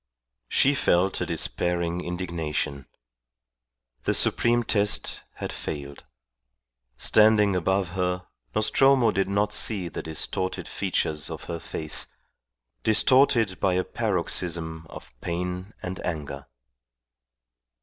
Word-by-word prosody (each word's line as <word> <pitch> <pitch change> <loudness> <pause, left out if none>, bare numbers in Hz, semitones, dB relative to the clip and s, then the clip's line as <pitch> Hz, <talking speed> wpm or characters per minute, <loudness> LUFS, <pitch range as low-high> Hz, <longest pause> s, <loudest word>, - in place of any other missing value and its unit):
She 140 - +4
felt 95 -8 +2
a - - -1
despairing 85 0 -1
indignation. 80 -6 -3 1.2
The - - +2
supreme 120 0 +3
test 105 -2 0
had - - -5
failed. 70 -1 -6 0.9
Standing 105 - +5
above 95 +1 +1
her, 90 0 -2 0.3
Nostromo 120 +2 +4
did 95 -1 0
not 105 +1 +1
see 100 -5 +2
the - - -5
distorted 95 +4 -3
features 75 -2 -1
of - - -7
her 85 -1 -5
face, 80 -1 -3 0.7
distorted 115 - +4
by 95 -2 +2
a 90 - +1
paroxysm 85 -6 -2
of - - -11
pain 90 +3 -3
and 90 +1 -5
anger. 70 -4 -5
90 Hz, 105 wpm, -26 LUFS, 85-105 Hz, 1.2 s, Standing